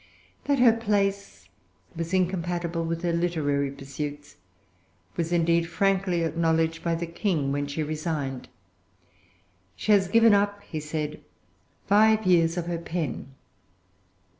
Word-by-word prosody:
That 285 Hz, -1 st, +2 dB
her 245 Hz, -3 st, +6 dB
place 200 Hz, -3 st, -1 dB, 0.5 s
was 165 Hz, +1 st, -4 dB
incompatible 175 Hz, -2 st, -1 dB
with 165 Hz, +1 st, -3 dB
her 170 Hz, -1 st, 0 dB
literary 155 Hz, -5 st, 0 dB
pursuits 145 Hz, +1 st, -7 dB, 0.8 s
was 165 Hz, 0 st, -2 dB
indeed 170 Hz, 0 st, +2 dB
frankly 185 Hz, 0 st, +1 dB
acknowledged 165 Hz, 0 st, 0 dB
by 170 Hz, -1 st, 0 dB
the 170 Hz, +1 st, -3 dB
King 165 Hz, -5 st, -1 dB
when 145 Hz, 0 st, -1 dB
she 145 Hz, +2 st, -3 dB
resigned. 150 Hz, -4 st, -4 dB, 1.3 s
"She 215 Hz, -, -1 dB
has 195 Hz, -2 st, +5 dB
given 225 Hz, +2 st, +5 dB
up," 205 Hz, 0 st, +1 dB
he 155 Hz, -, -5 dB
said, 150 Hz, 0 st, -4 dB, 0.6 s
"five 215 Hz, +2 st, +4 dB
years 170 Hz, -2 st, +3 dB
of 175 Hz, -, -2 dB
her 170 Hz, -1 st, -3 dB
pen." 160 Hz, -6 st, -4 dB
170 Hz, 125 wpm, -26 LUFS, 155-190 Hz, 1.3 s, her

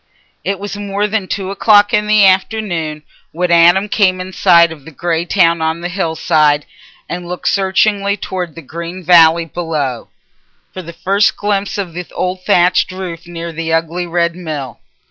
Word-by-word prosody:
It 195 Hz, -, -2 dB
was 205 Hz, +2 st, -6 dB
more 205 Hz, 0 st, -2 dB
than 210 Hz, -2 st, -2 dB
two 195 Hz, -1 st, -4 dB
o'clock 205 Hz, 0 st, +4 dB
in 210 Hz, 0 st, +1 dB
the 210 Hz, -1 st, +5 dB
afternoon 185 Hz, -6 st, 0 dB, 0.3 s
when 175 Hz, +2 st, -2 dB
Adam 175 Hz, +4 st, +5 dB
came 190 Hz, -3 st, +1 dB
in 185 Hz, +1 st, -7 dB
sight 170 Hz, -3 st, +4 dB
of 155 Hz, -4 st, -11 dB
the 160 Hz, -, -11 dB
grey 165 Hz, +2 st, -2 dB
town 170 Hz, -3 st, +2 dB
on 160 Hz, +1 st, -1 dB
the 175 Hz, -, -4 dB
hill 175 Hz, -3 st, -2 dB
side 150 Hz, -3 st, +2 dB, 0.4 s
and 175 Hz, 0 st, -6 dB
looked 180 Hz, 0 st, -5 dB
searchingly 200 Hz, +1 st, +1 dB
towards 180 Hz, -4 st, -5 dB
the 165 Hz, -, -10 dB
green 170 Hz, +5 st, -7 dB
valley 165 Hz, -1 st, +5 dB
below, 150 Hz, -6 st, -4 dB, 0.6 s
for 185 Hz, -, -6 dB
the 170 Hz, -1 st, -9 dB
first 195 Hz, +5 st, +1 dB
glimpse 205 Hz, -1 st, -2 dB
of 185 Hz, -4 st, -4 dB
the 180 Hz, +1 st, -6 dB
old 185 Hz, 0 st, -3 dB
thatched 180 Hz, -2 st, +3 dB
roof 180 Hz, -2 st, -7 dB
near 170 Hz, -1 st, -6 dB
the 165 Hz, 0 st, -4 dB
ugly 165 Hz, +2 st, -1 dB
red 170 Hz, 0 st, 0 dB
mill. 150 Hz, -8 st, -6 dB
175 Hz, 175 wpm, -15 LUFS, 165-195 Hz, 0.6 s, the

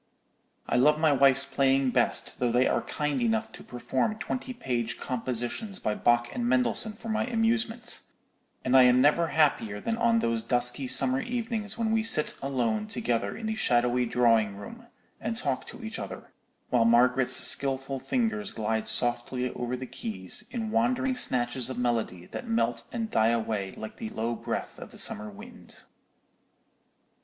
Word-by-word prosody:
"I -, -, +1 dB
love 150 Hz, +4 st, +4 dB
my 155 Hz, -1 st, +4 dB
wife's 135 Hz, 0 st, +4 dB
playing 135 Hz, -1 st, +2 dB
best, -, -, 0 dB
though 125 Hz, -1 st, +1 dB
they 125 Hz, +2 st, +3 dB
are -, -, +1 dB
kind 150 Hz, -3 st, -2 dB
enough 110 Hz, -2 st, 0 dB
to -, -, -12 dB
perform 130 Hz, -, -2 dB
twenty 255 Hz, +3 st, -4 dB
page 120 Hz, -, -3 dB
compositions 125 Hz, -, -3 dB
by 105 Hz, -, -2 dB
Bach 120 Hz, +2 st, +2 dB
and 120 Hz, 0 st, -1 dB
Mendelssohn 130 Hz, -, +1 dB
for 225 Hz, +1 st, -11 dB
my 220 Hz, +1 st, -1 dB
amusement: 230 Hz, 0 st, +1 dB, 0.6 s
and 130 Hz, +1 st, +2 dB
I 130 Hz, -, +9 dB
am 125 Hz, 0 st, +5 dB
never 150 Hz, +5 st, +3 dB
happier 140 Hz, -10 st, +1 dB
than 230 Hz, -, -2 dB
on 235 Hz, -1 st, +3 dB
those 115 Hz, -, 0 dB
dusky 125 Hz, +2 st, -1 dB
summer 130 Hz, +1 st, +3 dB
evenings 225 Hz, -3 st, -3 dB
when 225 Hz, -1 st, 0 dB
we 225 Hz, 0 st, +2 dB
sit 220 Hz, -9 st, +3 dB
alone 115 Hz, -6 st, -1 dB
together 115 Hz, -4 st, -2 dB
in 225 Hz, -, -7 dB
the 220 Hz, -, -1 dB
shadowy 125 Hz, -, +1 dB
drawing 115 Hz, -4 st, +2 dB
room, 235 Hz, -, -11 dB, 0.3 s
and 225 Hz, +1 st, -4 dB
talk -, -, -2 dB
to 240 Hz, -, -11 dB
each 220 Hz, 0 st, -6 dB
other, 95 Hz, -2 st, -8 dB, 0.4 s
while 120 Hz, -2 st, +4 dB
Margaret's 125 Hz, +2 st, +5 dB
skilful 135 Hz, 0 st, +2 dB
fingers 220 Hz, -, -1 dB
glide 110 Hz, -, -2 dB
softly 120 Hz, +2 st, 0 dB
over 125 Hz, +1 st, -3 dB
the 130 Hz, -, -6 dB
keys 95 Hz, -7 st, -6 dB
in 225 Hz, -3 st, -4 dB
wandering 250 Hz, +3 st, +1 dB
snatches 125 Hz, -, +1 dB
of 130 Hz, -, -5 dB
melody 115 Hz, -8 st, -1 dB
that 245 Hz, -, -8 dB
melt 230 Hz, 0 st, 0 dB
and 230 Hz, -3 st, -4 dB
die 110 Hz, +1 st, +3 dB
away 110 Hz, -4 st, -2 dB
like 110 Hz, -, -9 dB
the 110 Hz, -, -5 dB
low 115 Hz, +2 st, -2 dB
breath 115 Hz, -, -5 dB
of -, -, -9 dB
the -, -, -15 dB
summer 105 Hz, +1 st, -1 dB
wind." 100 Hz, -, -13 dB
130 Hz, 165 wpm, -27 LUFS, -, 0.6 s, I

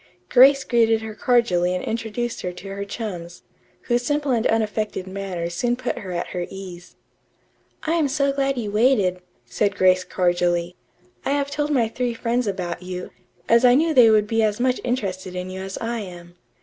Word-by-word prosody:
Grace 270 Hz, +2 st, +6 dB
greeted 225 Hz, -2 st, +2 dB
her 220 Hz, -1 st, -6 dB
cordially 195 Hz, -7 st, +2 dB
and 180 Hz, -, -3 dB
introduced 230 Hz, +1 st, -3 dB
her 180 Hz, -, -3 dB
to 180 Hz, +2 st, -10 dB
her 200 Hz, +1 st, -4 dB
chums, 180 Hz, -5 st, -6 dB, 0.4 s
whose 240 Hz, 0 st, 0 dB
simple 290 Hz, +2 st, -1 dB
and 235 Hz, -2 st, +2 dB
unaffected 215 Hz, -3 st, -1 dB
manners 190 Hz, -3 st, -4 dB
soon 240 Hz, +7 st, 0 dB
put 255 Hz, -, -3 dB
her 190 Hz, -3 st, -7 dB
at 175 Hz, 0 st, -3 dB
her 175 Hz, -1 st, -4 dB
ease. 180 Hz, -2 st, -10 dB, 0.9 s
"I 320 Hz, -, 0 dB
am 325 Hz, -4 st, +2 dB
so 280 Hz, 0 st, +1 dB
glad 275 Hz, -1 st, 0 dB
you 215 Hz, -4 st, -3 dB
waited," 210 Hz, -5 st, +2 dB, 0.3 s
said 200 Hz, -, -1 dB
Grace 185 Hz, -1 st, +4 dB
cordially. 175 Hz, -1 st, 0 dB, 0.5 s
"I 275 Hz, -, 0 dB
have 285 Hz, 0 st, -1 dB
told 295 Hz, +1 st, -1 dB
my 250 Hz, -6 st, +2 dB
three 240 Hz, +1 st, -2 dB
friends 235 Hz, 0 st, -1 dB
about 180 Hz, -3 st, -3 dB
you, 180 Hz, 0 st, -6 dB, 0.4 s
as 230 Hz, +1 st, +5 dB
I 245 Hz, 0 st, +7 dB
knew 320 Hz, +3 st, +2 dB
they 245 Hz, -5 st, +7 dB
would 215 Hz, -1 st, +4 dB
be 225 Hz, +1 st, 0 dB
as 215 Hz, 0 st, +1 dB
much 255 Hz, 0 st, +1 dB
interested 190 Hz, -7 st, -3 dB
in 180 Hz, +1 st, -4 dB
you 190 Hz, 0 st, -6 dB
as 190 Hz, 0 st, -6 dB
I 230 Hz, 0 st, -3 dB
am. 175 Hz, -4 st, -9 dB
215 Hz, 190 wpm, -22 LUFS, 185-245 Hz, 0.9 s, I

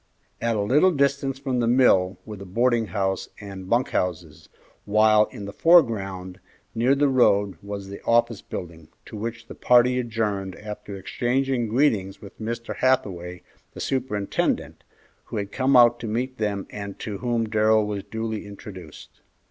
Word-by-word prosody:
At 115 Hz, 0 st, 0 dB
a 105 Hz, -, 0 dB
little 145 Hz, -, +4 dB
distance 140 Hz, -3 st, 0 dB
from 135 Hz, -2 st, -2 dB
the 120 Hz, -, +1 dB
mill 95 Hz, -7 st, +4 dB
were 110 Hz, -, -7 dB
the 100 Hz, -, -9 dB
boarding 115 Hz, +3 st, +1 dB
house 95 Hz, +1 st, -2 dB
and 95 Hz, -2 st, -9 dB
bunk 120 Hz, +2 st, +2 dB
houses, 80 Hz, -3 st, -3 dB, 0.3 s
while 110 Hz, +1 st, +4 dB
in 100 Hz, -, -9 dB
the 100 Hz, -, -7 dB
foreground, 100 Hz, -, +2 dB, 0.3 s
near 120 Hz, +4 st, +2 dB
the 145 Hz, +1 st, +3 dB
road 100 Hz, -, +2 dB
was 100 Hz, -1 st, -6 dB
the 100 Hz, +1 st, -9 dB
office 115 Hz, -2 st, +2 dB
building, 85 Hz, -3 st, -8 dB, 0.2 s
to -, -, -10 dB
which 115 Hz, +2 st, -5 dB
the -, -, -10 dB
party 125 Hz, +1 st, +4 dB
adjourned 105 Hz, -5 st, -2 dB
after 105 Hz, -1 st, -8 dB
exchanging 120 Hz, +5 st, -1 dB
greetings 110 Hz, -6 st, +1 dB
with 100 Hz, +2 st, -13 dB
Mr. 115 Hz, +1 st, -4 dB
Hathaway, 90 Hz, -9 st, 0 dB, 0.3 s
the -, -, -8 dB
superintendent, 120 Hz, -7 st, -2 dB, 0.4 s
who -, -, -6 dB
had 100 Hz, -1 st, -4 dB
come 130 Hz, 0 st, +3 dB
out 120 Hz, -1 st, +6 dB
to 115 Hz, -, -5 dB
meet 125 Hz, +4 st, -3 dB
them 100 Hz, -2 st, -2 dB
and 100 Hz, -1 st, -7 dB
to 105 Hz, -3 st, -6 dB
whom 120 Hz, -2 st, -1 dB
Darrell 110 Hz, 0 st, +3 dB
was 105 Hz, -2 st, -4 dB
duly 110 Hz, -1 st, -5 dB
introduced. 95 Hz, -5 st, -11 dB
110 Hz, 160 wpm, -24 LUFS, 100-120 Hz, 0.4 s, out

